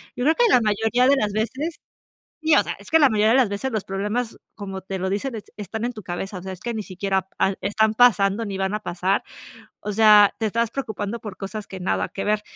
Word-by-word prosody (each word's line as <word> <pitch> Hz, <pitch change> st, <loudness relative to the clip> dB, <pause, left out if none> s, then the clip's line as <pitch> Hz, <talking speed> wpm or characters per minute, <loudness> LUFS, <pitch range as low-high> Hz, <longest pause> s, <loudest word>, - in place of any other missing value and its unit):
Yo 245 Hz, -, -3 dB
creo 315 Hz, +4 st, +4 dB
que 485 Hz, -, +4 dB
la 330 Hz, -, +6 dB
mayoría 225 Hz, +4 st, +2 dB
de 280 Hz, -, +5 dB
las 210 Hz, -6 st, 0 dB
veces, 260 Hz, +9 st, -2 dB, 0.7 s
sí, 315 Hz, 0 st, +4 dB
o -, -, +5 dB
sea, -, -, -4 dB
es -, -, -13 dB
que 320 Hz, -, +5 dB
la 285 Hz, -3 st, +6 dB
mayoría 215 Hz, -1 st, +3 dB
de 245 Hz, -, +5 dB
las 250 Hz, -5 st, +3 dB
veces 205 Hz, +7 st, -3 dB
los 215 Hz, -4 st, -2 dB
problemas, 210 Hz, +5 st, -3 dB, 0.2 s
como 195 Hz, -2 st, -6 dB
te 190 Hz, 0 st, -5 dB
lo 190 Hz, +1 st, -2 dB
dicen: 230 Hz, +5 st, -2 dB
"Es 215 Hz, -, -6 dB
están 215 Hz, +2 st, -4 dB
en 245 Hz, -, -3 dB
tu 215 Hz, -, -9 dB
cabeza", 185 Hz, +1 st, -5 dB
o -, -, -11 dB
sea, 190 Hz, +1 st, -6 dB
es 180 Hz, -, -11 dB
que 240 Hz, +2 st, -4 dB
ni 220 Hz, -, -3 dB
siquiera, 190 Hz, 0 st, -2 dB
ah, 195 Hz, -, +2 dB
están 215 Hz, +2 st, +1 dB
pasando, 215 Hz, -2 st, +4 dB
ni 200 Hz, -2 st, -4 dB
van 190 Hz, +1 st, -1 dB
a 210 Hz, -, -1 dB
pasar. 185 Hz, 0 st, -1 dB, 0.6 s
O 210 Hz, -, -4 dB
sea, 210 Hz, -1 st, +7 dB
te 220 Hz, -, +1 dB
estás 230 Hz, +1 st, 0 dB
preocupando 225 Hz, -4 st, -4 dB
por 205 Hz, -4 st, -8 dB
cosas 205 Hz, +1 st, -6 dB
que 190 Hz, -, -8 dB
nada 180 Hz, -, -1 dB
que 195 Hz, -, -5 dB
ver. 210 Hz, 0 st, +1 dB
210 Hz, 255 wpm, -23 LUFS, 195-235 Hz, 0.7 s, sea